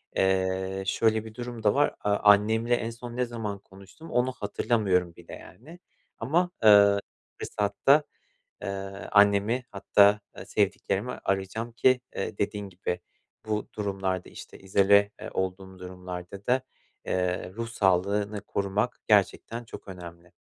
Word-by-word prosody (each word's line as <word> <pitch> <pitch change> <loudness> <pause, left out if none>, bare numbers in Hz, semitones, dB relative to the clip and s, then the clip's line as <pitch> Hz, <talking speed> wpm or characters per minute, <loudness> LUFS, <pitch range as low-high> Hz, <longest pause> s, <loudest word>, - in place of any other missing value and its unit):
eee, 95 0 0
şöyle 110 +3 +1
bir 110 - -10
durum 120 -1 -7
da 105 - +4
var: 145 +1 +2
A 105 0 +1
annemle 110 +3 +4
en 115 -1 -3
son 120 +1 -9
ne 125 0 +1
zaman 110 -4 -5
konuştum, 100 +12 -14
onu 125 +1 +1
hatırlamıyorum 100 -6 0
bile 85 - -13
yani 160 +9 -14 0.4
ama 170 +9 +1 0.9
fırsatta, 105 +9 +2 0.6
eee, - - -5 0.4
annemi 105 +4 +4
hatta, 100 +1 +4 0.2
eee, - - -8
sevdiklerimi 100 +2 -1
arayacağım 100 +4 -3
ki, 125 +2 +3
eee, 100 +1 -4
dediğin 105 0 -2
gibi, 90 -1 -4 0.5
bu 105 -1 -2
durumlarda, 95 -3 -2
işte, - - -12
izole, 100 +1 +4
eee, - - -6
olduğum 95 0 -4
durumlarda 90 +1 -8
da, 130 +1 +3 0.4
eee, 90 0 -1
ruh 115 +2 -5
sağlığını 100 0 +1
korumak 100 +3 -2
gerçekten 110 +3 +1
çok 115 - -11
önemli. 85 -2 -10
100 Hz, 130 wpm, -27 LUFS, 95-115 Hz, 0.9 s, da